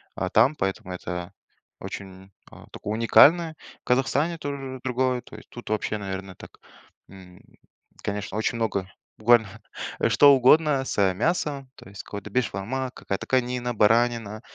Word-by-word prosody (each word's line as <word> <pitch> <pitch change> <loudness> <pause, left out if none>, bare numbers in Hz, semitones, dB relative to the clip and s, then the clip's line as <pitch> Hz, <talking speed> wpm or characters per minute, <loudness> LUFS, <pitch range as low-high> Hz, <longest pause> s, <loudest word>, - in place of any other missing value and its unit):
а, 95 - -2
там, 120 +9 +4
поэтому 95 -5 -3
это 90 -1 -6 0.5
очень, 95 0 -9 0.2
а, - - -14
такое 105 - -5
уникальное. 160 +9 +5 0.3
В - - -75
Казахстане 140 +6 +1
тоже 135 -3 -6
другое, 130 0 0
то - - -14
есть - - -14
тут 120 - -10
вообще, 105 0 -1
наверно, 95 -2 -6
так, - - -13 0.6
м, 95 -2 -15 0.6
конечно, 100 0 -4
очень 110 - -1
много 100 -5 -1 0.3
буквально, 110 0 +4 0.5
э, - - +2
что 145 -1 +7
угодно 140 +2 +4
с, - - -4
э, 95 -2 +3
мясом, 140 - -1
то - - -15
есть 100 - -9
какой-то 100 0 -8
бешбармак, 125 +3 -2
какая-то 100 - -5
конина, 125 -1 0
баранина, 115 0 +2
115 Hz, 150 wpm, -25 LUFS, 100-130 Hz, 0.6 s, что